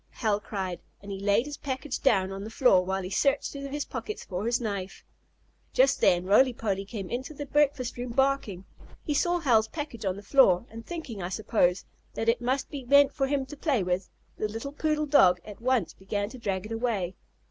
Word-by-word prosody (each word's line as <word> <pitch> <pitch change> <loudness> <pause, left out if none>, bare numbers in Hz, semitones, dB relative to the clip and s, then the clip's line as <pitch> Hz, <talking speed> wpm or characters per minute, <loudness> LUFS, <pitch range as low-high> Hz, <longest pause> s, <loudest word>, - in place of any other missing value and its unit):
Hal 210 -3 0
cried, 190 -4 -4 0.2
and 200 - -9
he 195 - -5
laid 205 +5 +2
his 295 0 -6
package 265 0 -4
down 195 -8 +3
on 195 +1 -6
the 215 - -6
floor, 225 -6 +4
while 190 +1 -2
he 180 - -5
searched 275 +7 +1
through 280 -1 -6
his 290 +1 -3
pockets 425 - -6
for 190 +3 -3
his 235 - +1
knife. 200 -5 -5 0.7
Just 270 +2 +3
then 175 0 +4
Roly 245 +7 +5
Poly 200 -4 -2
came 200 -2 -6
into 260 +7 -5
the 290 - -5
breakfast 280 -3 +1
room, 245 0 -4
barking. 235 -7 0 0.4
He 300 - -1
saw 345 +5 +2
Hal's 235 -9 +3
package 290 -5 -6
on 190 -2 0
the 200 - -10
floor, 205 -5 +4
and, 230 +1 -8
thinking, 290 - -6
I 175 - -3
suppose, 190 -2 +1 0.3
that 225 - 0
it 235 +1 +1
must 260 +2 -1
be 280 -3 -5
meant 280 +2 +5
for 270 -3 0
him 275 -1 0
to 295 - -9
play 280 - 0
with, 180 +1 -1 0.3
the 215 - 0
little 225 +6 -6
poodle 305 0 0
dog 185 -12 +5
at 210 +1 -10
once 235 -9 +1
began 205 +1 -3
to 255 - -10
drag 195 -3 -2
it 215 - -9
away. 225 -6 -1
230 Hz, 215 wpm, -28 LUFS, 195-275 Hz, 0.7 s, Roly